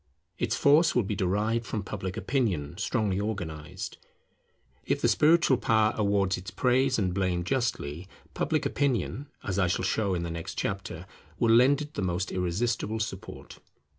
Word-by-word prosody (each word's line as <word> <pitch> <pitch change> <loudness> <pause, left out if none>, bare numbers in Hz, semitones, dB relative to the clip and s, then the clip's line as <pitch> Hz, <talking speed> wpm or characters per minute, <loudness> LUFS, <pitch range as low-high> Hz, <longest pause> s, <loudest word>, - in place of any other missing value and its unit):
Its - - 0
force 155 +3 +4
will 125 - +3
be 100 - -3
derived 105 +4 0
from 110 -2 -4
Public 95 -2 -5
Opinion 95 - -1
strongly 100 -1 0
organized. 85 -8 -5 0.9
If - - 0
the - - +2
spiritual 155 -4 +4
power 110 -1 +2
awards 100 -3 +1
its 95 +2 -8
praise 130 +4 +2
and 95 -4 0
blame 90 -2 0
justly, 90 - -2 0.3
public - - 0
opinion, 140 0 -1 0.2
as 95 0 -2
I 90 - +3
shall 90 - 0
show 100 -4 0
in 85 - -2
the 85 - -4
next 85 0 -6
chapter, 95 -3 -3 0.3
will 115 +2 +3
lend 135 +5 +5
it 150 +1 -11
the - - -3
most 90 +1 -1
irresistible 105 +5 -1
support. 105 -3 -6
100 Hz, 160 wpm, -28 LUFS, 90-120 Hz, 0.9 s, lend